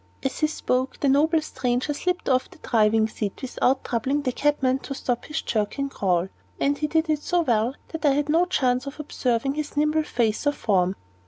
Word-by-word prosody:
As 270 - -2
he 310 - +3
spoke, 260 -3 -1
the 285 - +1
noble 310 +3 +3
stranger 250 0 -1
slipped 355 +4 -2
off 255 -1 +2
the - - -16
driving 220 -1 +3
seat 210 -2 -4
without 260 0 0
troubling 265 +5 -1
the 255 - 0
cabman 270 -1 +1
to 275 - -6
stop 245 -2 -2
his 310 +1 -3
jerking 230 +6 -1
crawl, 185 -6 0 0.3
and 285 +1 +2
he 300 +1 -1
did 320 +2 +1
it 305 -1 0
so 350 +2 +1
well 240 -3 +1
that 320 -2 -6
I 285 -2 +5
had 290 +1 0
no 330 +4 +3
chance 255 -6 +1
of 275 - -7
observing 270 -3 -1
his 300 0 -5
nimble 305 +1 +3
face 240 -3 0
or 290 - +3
form. 190 -7 +1
270 Hz, 200 wpm, -24 LUFS, 240-300 Hz, 0.3 s, I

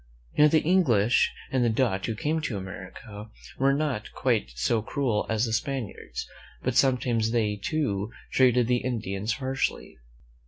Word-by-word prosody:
Now, 150 - +7
the 155 +1 +3
English 130 - +3 0.2
and 120 -4 +2
Dutch 110 -7 +1
who 115 - -2
came 155 +8 -1
to 120 -9 -3
America 100 +3 -9 0.3
were 135 +1 +4
not 140 -6 -1
quite 65 - 0
so 110 - +1
cruel 115 -2 -1
as 110 +1 +1
the 110 - -3
Spaniards, 125 -2 -3 0.4
but - - -1
sometimes 125 -4 +2
they, 110 -3 +1
too, 105 -3 -2 0.2
treated 125 -2 +4
the 125 +1 +2
Indians 110 -4 -2
harshly. 130 - -3
120 Hz, 145 wpm, -27 LUFS, 105-135 Hz, 0.4 s, Now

